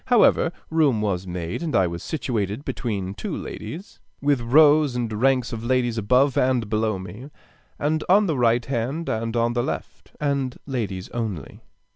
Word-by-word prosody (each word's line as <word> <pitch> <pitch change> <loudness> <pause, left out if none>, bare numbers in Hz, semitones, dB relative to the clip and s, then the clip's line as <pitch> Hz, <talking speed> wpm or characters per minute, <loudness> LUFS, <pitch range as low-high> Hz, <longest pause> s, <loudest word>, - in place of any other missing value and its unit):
However, 235 -8 +4 0.2
room 150 -8 +3
was 95 -3 -1
made, 90 - -4
and 160 -7 -2
I 95 - +4
was 85 -1 -4
situated 115 -5 -3
between 100 -6 -3
two - - -4
ladies, 185 +7 -8 0.2
with 140 -3 +1
rows 145 +2 +5
and 120 -3 -2
ranks 125 +2 +1
of 115 0 -5
ladies 120 -2 +1
above 125 +6 +3
and 125 -4 +2
below 110 -1 0
me, 105 +8 -9 0.5
and 155 +1 0
on 205 +3 +6
the 160 -5 0
right 120 -1 +2
hand 135 +6 -2
and 115 +1 -2
on 115 0 +2
the 120 - +1
left, - - -5
and 140 -3 -1
ladies 105 -9 -3
only. 105 - -5
120 Hz, 165 wpm, -24 LUFS, 110-140 Hz, 0.5 s, on